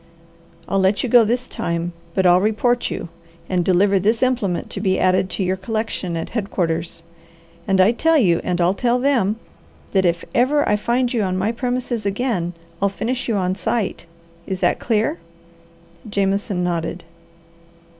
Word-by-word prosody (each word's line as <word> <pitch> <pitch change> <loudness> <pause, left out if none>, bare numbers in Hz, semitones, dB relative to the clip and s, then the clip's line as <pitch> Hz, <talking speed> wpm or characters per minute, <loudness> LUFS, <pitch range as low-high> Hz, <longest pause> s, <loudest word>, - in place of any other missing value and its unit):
I'll 195 - +1
let 190 +2 +2
you 250 - -1
go 240 0 +7
this 240 +3 -1
time, 170 +1 -3 0.2
but 190 - +2
I'll 180 0 +6
report 240 +4 +1
you, - - -5 0.4
and 180 -2 0
deliver 195 +2 +3
this 220 +6 +1
implement 235 -9 0
to 195 - -4
be 190 -2 +1
added 185 0 +2
to 195 - -2
your 185 +1 0
collection 190 -4 -3
at 165 - -5
headquarters. 170 -7 -2 0.6
And 195 -1 +2
I 190 +4 +6
tell 320 +7 +2
you, 180 - +3
and 180 -1 -1
I'll 175 +2 +3
tell 240 +4 +1
them, 245 -6 +2 0.6
that 190 -1 +2
if 170 -1 0
ever 285 +4 +2
I 210 - +3
find 240 +4 0
you 230 - +1
on 185 -2 -1
my 200 +4 0
premises 245 -1 -2
again, 200 -4 -1 0.3
I'll 200 - +3
finish 235 +6 -3
you 225 - +1
on 185 -2 0
sight. 190 -1 -2 0.4
Is 190 -1 -3
that - - +2
clear?" 230 +8 0 0.9
Jameson 200 -1 0
nodded. 170 0 -2
200 Hz, 165 wpm, -21 LUFS, 185-235 Hz, 0.9 s, go